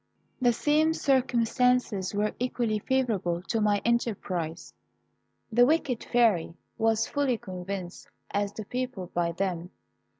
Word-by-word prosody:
"The 245 -1 +5
same 305 +6 +2
circumstances 250 -6 +1
were 210 +1 0
equally 240 -3 0
favourable 205 -9 0
to 225 +3 -1
my 205 -1 +2
enterprise. 185 -8 -1 0.8
The 240 +2 +5
wicked 280 -6 +1
Fairy 215 -9 +2 0.2
was 225 0 +2
as - - -12
fully 280 -4 +1
convinced 185 -1 -6 0.2
as 205 0 0
the 215 +1 -7
people 250 -7 -4
by 170 -1 +1
them. 180 -1 -2
220 Hz, 125 wpm, -28 LUFS, 185-250 Hz, 0.8 s, The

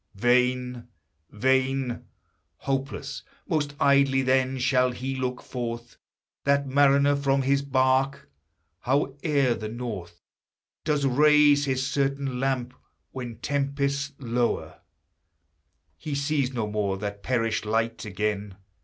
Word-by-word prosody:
Vain, 125 +2 +1 0.4
vain! 130 +2 0 0.5
Hopeless 135 +1 -3 0.3
most 150 -5 -1
idly 140 -1 +4
then, 130 0 +2
shall 130 0 +2
he 130 +2 -4
look 125 -1 -3
forth, 120 -1 -6 0.5
That 140 0 +2
mariner 140 +1 +4
from 135 -1 +1
his 140 +1 +2
bark. 135 0 +1 0.5
Howe'er 140 0 +1
the 110 -2 -5
north 105 -8 -6 0.6
Does 150 -2 +1
raise 145 +1 +5
his 130 -1 0
certain 140 -2 -1
lamp, 130 -2 -1 0.4
when 125 -3 -6
tempests 140 0 -1
lower 120 -2 -2 1.2
He 150 -2 -4
sees 140 -2 0
no 120 -4 -2
more 105 -2 -1
that 100 0 -5
perished 115 -3 -1
light 115 +1 -1
again! 105 -1 -3
130 Hz, 110 wpm, -26 LUFS, 120-140 Hz, 1.2 s, raise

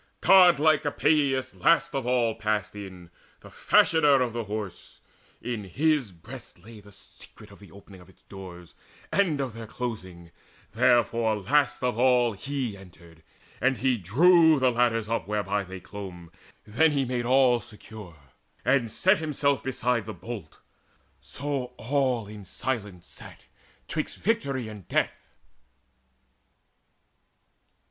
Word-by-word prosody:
Godlike 160 -5 +5
Epeius 145 -2 +1
last 170 0 +2
of 135 -3 -3
all 120 -3 +1
passed 110 -2 -2
in, 95 -4 -10 0.3
The - - -14
fashioner 150 -4 +4
of 120 -2 -4
the 115 -1 -4
Horse; 105 -3 -7 0.4
in 115 -4 -4
his 140 - 0
breast 110 +10 -11
lay 110 +5 -14
The 105 0 -17
secret 100 - -14
of - - -16
the 100 - -16
opening 100 -1 -15
of 90 - -18
its 95 - -23
doors 90 -4 -11 0.4
And 180 -8 +1
of 130 -5 -3
their 115 0 -9
closing: 95 -9 -7 0.4
therefore 115 -2 +2
last 120 +5 +1
of 125 -2 -1
all 125 -2 +3
He 125 +1 -4
entered, 85 -4 -16 0.4
and 130 0 +2
he 130 -1 +1
drew 160 - +5
the 130 -2 +2
ladders 115 -2 +1
up 110 -6 -2
Whereby 105 -1 -1
they 95 0 -9
clomb: 90 -4 -10 0.3
then 150 +8 +2
made 135 -3 0
he 120 -1 -1
all 125 0 +4
secure, 105 -5 -12 0.5
And 130 -4 +2
set 190 - +2
himself 145 -3 0
beside 125 -4 -1
the 110 - -6
bolt. 110 -10 -9 0.6
So 140 -3 -5
all 130 -3 0
In 105 0 -10
silence 100 -1 -5
sat - - -12 0.5
'twixt - - -4
victory 140 - -1
and 105 -4 -11
death. - - -2
120 Hz, 135 wpm, -26 LUFS, 100-135 Hz, 0.6 s, Godlike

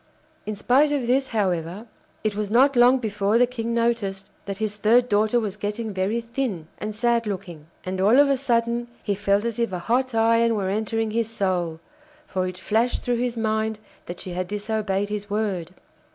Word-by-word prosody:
In 215 - -2
spite 265 +8 +3
of 280 -4 0
this, 260 +3 +2
however, 185 -2 -1 0.4
it 215 -2 0
was 210 -1 -2
not 260 +5 +4
long 245 +2 +6
before 210 -2 0
the 245 - +5
King 235 -1 -3
noticed 225 -5 -1 0.2
that 195 -1 -4
his 215 -1 -2
third 230 +4 +4
daughter 215 +2 +2
was 210 -4 -3
getting 210 +1 -4
very 195 +5 0
thin 230 -8 -3
and 215 0 -4
sad 235 0 +1
looking. 175 -6 -6 0.2
And 185 0 -2
all 215 +6 +5
of 285 - +6
a 275 - +3
sudden 235 -2 0 0.2
he 205 - 0
felt 200 +1 +1
as 235 -1 -2
if 235 -3 0
a 180 - -2
hot 245 +6 0
iron 230 0 +3
were 195 -3 -1
entering 220 +2 -1
his 225 0 0
soul, 180 -7 -1 0.5
for 185 -9 -2
it 180 0 -6
flashed 220 +6 0
through 245 -1 0
his 245 0 -2
mind 220 -1 0 0.3
that 175 +1 -6
she 185 - -6
had 180 +1 -3
disobeyed 205 -1 -2
his 210 0 -4
word. 200 -5 -2
215 Hz, 195 wpm, -24 LUFS, 200-235 Hz, 0.5 s, long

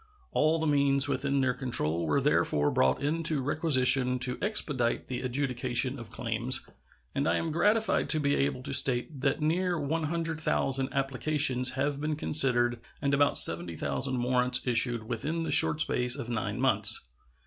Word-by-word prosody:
All 155 +2 +1
the 160 - -3
means 140 -2 +3
within 140 0 +1
their 130 -1 0
control 85 - 0
were 75 - +1
therefore 75 0 0
brought 65 - 0
into 155 0 0
requisition 130 -3 +2
to 125 0 +1
expedite 145 - 0
the 125 -1 -5
adjudication 130 0 -1
of 115 - -10
claims, - - -2 0.5
and 140 - -1
I - - +1
am 165 - -3
gratified 210 +7 0
to 155 - +4
be 145 -1 0
able 135 -2 -2
to - - -6
state 130 +2 +2
that 135 +3 -1
near 175 +2 -1
100,000 155 -3 -2
applications 135 -1 0
have 140 +1 -3
been 155 0 -2
considered 125 -6 +1 0.2
and 140 -1 -2
about 145 0 +2
70,000 85 - +3
warrants 125 0 +1
issued 120 -1 +2
within 145 +9 -4
the - - -4
short 155 - +3
space 125 -3 +1
of 135 -5 -7
nine 110 - -4
months. - - 0
135 Hz, 155 wpm, -28 LUFS, 125-150 Hz, 0.5 s, to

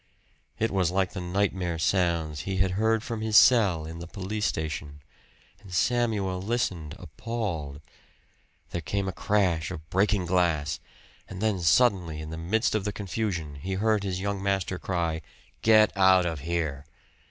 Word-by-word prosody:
It 115 +1 0
was 95 -3 +2
like 95 0 0
the 95 - -4
nightmare 90 -1 -1
sounds 85 -3 0
he 95 +3 -3
had 95 -1 +2
heard 110 +3 +1
from 115 -2 -4
his 110 -1 +3
cell 100 -12 +5
in 80 +1 -7
the 85 - -7
police 105 +3 -2
station, 75 -2 -4 0.6
and 100 - -14
Samuel 100 -1 0
listened 95 -8 -2
appalled. 85 -6 -5 0.9
There 85 - -3
came 100 +5 -2
a - - -1
crash 90 -5 +1
of 80 -4 -8
breaking 100 0 +2
glass; 85 -4 +1 0.5
and 95 - -7
then 110 -2 0
suddenly, 90 -4 +3
in 80 0 -7
the 80 - -5
midst 105 +8 +1
of 110 -2 0
the 105 - -2
confusion, 95 -7 -3
he 95 +4 -3
heard 105 +1 +1
his 95 -2 -2
young 100 0 -2
master 95 -2 -1
cry, 85 -3 -2 0.4
"Get 110 -1 +5
out 95 -1 +5
of 80 -3 -2
here!" 75 -2 -3
95 Hz, 160 wpm, -27 LUFS, 85-105 Hz, 0.9 s, cell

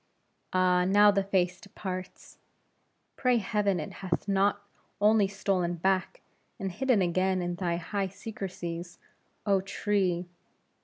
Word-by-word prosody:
Ah, 180 -1 +3
now 205 +3 +6
the 200 -1 +2
face 185 -2 0
departs. 185 -2 -7 0.8
Pray 250 -2 +3
heaven 200 -3 0
it 155 - -6
hath 185 0 -2
not 200 +1 +2 0.4
only 210 0 +4
stolen 190 -3 -1
back, 185 +2 0 0.4
and 195 -1 -3
hidden 250 0 +2
again 185 +2 +1
in 175 0 -2
thy 175 -1 -1
high 195 +3 -2
secrecies, 180 -4 -6 0.5
oh 195 -2 +3
tree! 195 -2 0
190 Hz, 120 wpm, -29 LUFS, 180-200 Hz, 0.8 s, now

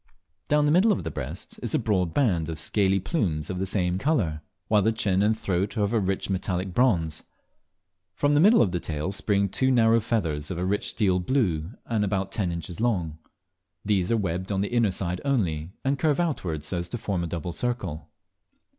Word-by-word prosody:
Down 150 0 +3
the 145 - +3
middle 190 +7 +5
of 195 - 0
the - - -4
breast - - -6
is - - -2
a - - +4
broad 95 -6 0
band 90 - +1
of 80 -2 -5
scaly 95 +3 +2
plumes 90 - -1
of 90 - -4
the 95 - -1
same 90 -2 0
colour, 95 - 0 0.3
while 105 -1 +4
the 110 - +2
chin 100 -4 +1
and 110 +2 +2
throat 100 +2 -1
are 105 - +2
of 100 +3 0
a 115 - +3
rich 95 -1 -1
metallic 95 -1 -2
bronze. 85 - +2 0.9
From 145 0 +2
the 145 - +4
middle 210 +8 +6
of 95 - 0
the 90 - -1
tail 80 +2 -3
spring 100 0 +1
two 130 +7 +1
narrow 115 -2 +4
feathers 80 -10 -1
of 90 - -4
a 90 - -1
rich 100 +2 0
steel 95 -5 +1
blue, 90 - 0
and 110 -3 0
about 95 -1 -1
ten 95 -5 -1
inches 85 +1 -6
long. 90 -10 -1 0.7
These 100 -3 +1
are 115 - +3
webbed 95 -1 -2
on 95 -1 0
the 100 +4 -2
inner 115 -3 +3
side 90 -1 -3
only, 90 - 0 0.2
and 135 0 +1
curve 155 0 +2
outward, 90 - -1
so 85 +3 -3
as 85 0 -5
to 120 - -3
form 100 -5 -2
a - - -2
double 85 +1 -4
circle. 85 -9 -3
95 Hz, 210 wpm, -26 LUFS, 85-115 Hz, 0.9 s, middle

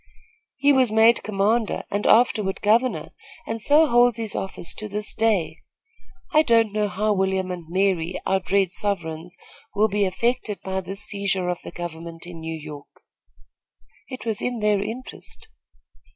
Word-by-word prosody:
He 285 +2 +4
was 260 -4 +3
made 225 +2 +5
commander 215 +2 0
and 205 +1 -1
afterward 215 -5 +3
governor, 230 +5 +2 0.3
and 225 0 -4
so 295 +7 +5
holds 240 -3 +4
his 225 -2 -4
office 190 -3 -4
to 215 0 -7
this 210 +1 -2
day. 190 -8 0 0.7
I 310 - +7
don't 230 -6 +3
know 210 -1 +1
how 210 +2 0
William 190 -1 0
and 175 -2 -6
Mary, 185 -2 0
our 190 - +2
dread 190 0 +1
sovereigns, 175 -3 -3 0.4
will 215 +2 +3
be 205 0 +1
affected 225 +2 -1
by 190 0 -2
this 195 +2 -2
seizure 200 -3 -1
of 180 - -3
the - - -7
government 170 -1 -8
of 175 - -9
New 160 -1 -6
York." 150 -2 -9 1.2
"It 255 -3 -8
was 220 -3 -2
in 245 -1 -2
their 210 -2 +2
interest." 255 - -8
205 Hz, 155 wpm, -23 LUFS, 180-225 Hz, 1.2 s, I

